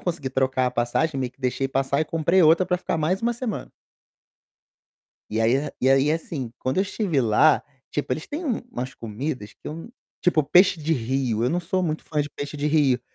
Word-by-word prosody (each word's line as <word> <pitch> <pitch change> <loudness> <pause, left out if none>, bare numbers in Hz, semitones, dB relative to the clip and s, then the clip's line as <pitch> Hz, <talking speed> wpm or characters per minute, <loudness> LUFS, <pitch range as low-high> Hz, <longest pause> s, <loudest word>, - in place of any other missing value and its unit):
consegui 165 -6 -3
trocar 130 0 +1
a - - 0
passagem, 130 +6 0
meio 130 -2 -2
que 125 +2 -33
deixei 130 +1 -1
passar 135 +1 0
e - - +2
comprei 165 +4 +2
outra 165 +3 +5
para 180 - +1
ficar 180 - -2
mais 180 +6 0
uma 235 +1 +2
semana. 240 -2 -4 1.6
E 110 - -1
aí 130 +6 +2
e 130 - +3
aí 135 +3 +4
assim, 155 -6 -4
quando 130 - -2
eu - - +4
estive 195 -7 0
lá, 115 +6 +4 0.3
tipo 145 -3 -2
eles 155 +5 -3
têm 310 +5 -4
umas 225 - -4
comidas 115 0 -5
que - - -35
eu 165 +7 -7 0.3
tipo 170 -3 +3
peixe 180 +5 +5
de 155 +2 0
rio, 125 -3 0
eu 125 - +1
não 175 - +1
sou 185 +2 -1
muito 160 -3 -2
fã 150 - -1
de 145 - -7
peixe 145 +2 -6
de 145 +1 -1
rio, 145 -5 +3
145 Hz, 205 wpm, -24 LUFS, 130-170 Hz, 1.6 s, outra